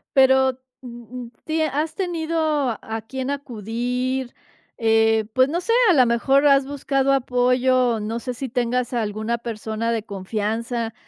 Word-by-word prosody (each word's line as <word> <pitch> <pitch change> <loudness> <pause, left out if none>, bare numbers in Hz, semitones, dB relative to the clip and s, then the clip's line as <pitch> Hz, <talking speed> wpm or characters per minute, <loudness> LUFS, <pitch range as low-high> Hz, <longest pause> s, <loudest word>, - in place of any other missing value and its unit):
Pero 265 -1 +4 0.2
m 240 -2 -10
m 250 -2 -7
ti 320 0 -1
¿Has 310 +1 -1
tenido 335 -4 -2 0.4
a 225 0 -5
quién 265 +1 -4
acudir?, 250 0 -3 0.5
eh, 225 -1 +3
pues 260 +1 +4
no 335 +4 -1
sé, 460 +6 0 0.2
a - - +6
la 260 -5 +5
mejor 270 +4 +2
has 275 -1 +4
buscado 275 -1 0
apoyo, 250 -2 +2
no 220 +2 -3
sé 250 +1 -5
si 265 +3 -4
tengas 245 +1 -1
alguna 220 0 -2
persona 225 0 -3
de 225 -2 -1
confianza, 220 +3 -3
250 Hz, 145 wpm, -22 LUFS, 230-270 Hz, 0.5 s, a